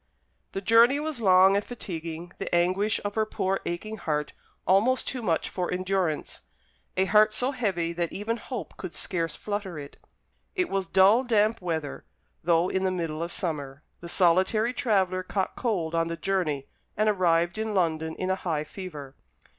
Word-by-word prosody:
The 195 - -3
journey 230 +6 +5
was 300 -5 -3
long 190 -1 +6
and 200 - +1
fatiguing; 170 -7 -6
the - - -1
anguish 185 +5 +2
of 205 - -2
her 220 - +2
poor 195 -2 -1
aching 215 +6 -4
heart 150 -5 -2 0.3
almost 220 +8 +3
too 255 - -2
much 170 -7 0
for 180 -2 -3
endurance 185 -3 -1 0.6
a 190 - +3
heart 215 +2 +5
so 250 +5 +1
heavy 190 -10 -1
that 170 -1 -2
even 225 +3 -2
hope 245 -1 -7
could 185 -3 -7
scarce 165 -4 -2
flutter 205 -5 -4
it. 145 -1 -9 0.6
It 365 -2 0
was 195 -2 -1
dull 195 +7 +5
damp 220 -3 +2
weather, 160 -5 -3 0.4
though 170 +1 +3
in 190 0 -1
the 190 - +2
middle 165 -4 -3
of 170 +1 -2
summer. 145 -6 -3 0.2
The 170 - -8
solitary 190 +7 +3
traveller 190 -7 +1
caught 190 +1 -2
cold 180 -10 -1
on 165 0 +1
the 165 0 -4
journey, 165 -9 -1 0.3
and 215 +1 +2
arrived 175 -2 +2
in 220 -1 -2
London 160 -3 0
in 185 0 -2
a - - +2
high 155 -4 -1
fever. 150 -6 -8
185 Hz, 170 wpm, -27 LUFS, 165-215 Hz, 0.6 s, long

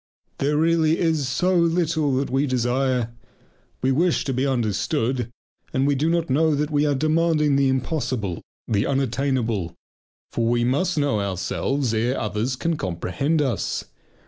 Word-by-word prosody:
Ah! - - -46
there 150 +3 +2
is 165 0 +3 0.2
really 165 -1 +1
so 155 +6 0
little 165 -4 +2
that 135 0 -1
we 135 +2 +1
desire: 125 -1 0 0.7
we 130 - +3
wish 165 +5 +2
to 135 - -1
be 130 +2 0
understood, 120 0 0 0.4
and 140 +2 +2
do 150 +4 +1
not 170 -1 +1
know 155 +3 +2
that 150 +2 -1
we 150 0 +2
are 145 - +2
demanding 155 0 +2
the 135 -1 +3
impossible, 125 - -2 0.3
the 105 0 +1
unattainable. 125 -8 -1 0.6
For 115 -1 0
we 120 0 +2
must 145 +8 +1
know 145 -7 +1
ourselves 100 +7 -1
ere 120 +4 0
others 110 +4 -2
can 165 +5 -1
comprehend 100 - -1
us. 130 -4 -2
135 Hz, 150 wpm, -23 LUFS, 120-150 Hz, 0.7 s, is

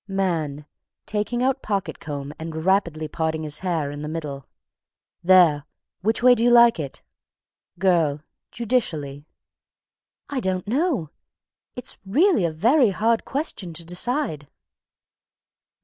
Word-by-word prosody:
MAN. 165 -7 -2 0.4
(Taking 215 +4 -2
out 265 +1 +1
pocket 195 -6 -3
comb 145 -1 -6
and 160 0 -5
rapidly 170 -5 +1
parting 160 +1 -2
his 150 0 -3
hair 165 -6 -1
in 145 0 -7
the 150 - -5
middle.) 150 -4 -6 0.8
"There! 170 -5 +5 0.4
Which 220 +4 0
way 250 0 +8
do 230 -1 0
you 240 - +5
like 235 -4 +6
it?" 140 -3 -6 0.7
GIRL. 170 -6 +2 0.3
(Judicially.) 160 - -2 1.0
"I 280 - -3
don't 185 -4 -2
know. 255 - 0 0.6
It's 250 - -6
really 245 - +3
a 165 - 0
very 235 - +3
hard 225 +4 +1
question 260 - -4
to 165 +1 -3
decide." 180 - -1
180 Hz, 125 wpm, -23 LUFS, 155-235 Hz, 1.0 s, way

